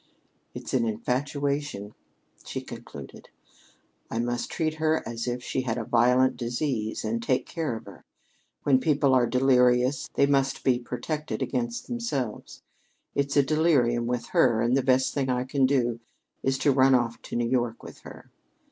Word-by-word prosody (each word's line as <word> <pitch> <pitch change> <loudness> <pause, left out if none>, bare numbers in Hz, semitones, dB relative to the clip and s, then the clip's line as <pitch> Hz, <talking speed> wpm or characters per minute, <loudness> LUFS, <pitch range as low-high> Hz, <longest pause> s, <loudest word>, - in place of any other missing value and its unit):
"It's - - -7
an - - +3
infatuation," 140 - -2 0.5
she - - -5
concluded. - - -10 0.8
"I - - -4
must 120 +1 -2
treat 155 -2 -2
her 160 0 +1
as 115 +1 -4
if 125 0 -3
she 130 - -2
had 125 -2 -2
a 120 - -2
violent 125 +3 +3
disease 120 -3 -2
and 115 +1 -1
take 125 +2 0
care 160 -8 -3
of 110 - -9
her. 100 -3 -13 0.6
When 135 -3 +4
people 140 -1 +2
are 125 -2 +4
delirious 125 +2 +3
they 140 - +4
must 135 -1 +1
be 125 -2 +3
protected 150 +5 -4
against 120 -3 -3
themselves. 225 - -4 0.5
It's 140 0 0
a 140 - +6
delirium 135 -6 +2
with 125 -1 -2
her, 120 -3 +3
and 120 +2 +2
the 135 - +3
best 130 0 +2
thing 135 -2 -1
I 125 0 +1
can 130 0 +2
do 120 -4 +1 0.4
is 135 0 0
to 140 - +3
run 135 0 +5
off 120 -2 0
to - - -7
New 120 0 +1
York 120 -2 -1
with - - -11
her. - - -13
130 Hz, 165 wpm, -26 LUFS, 120-140 Hz, 0.8 s, a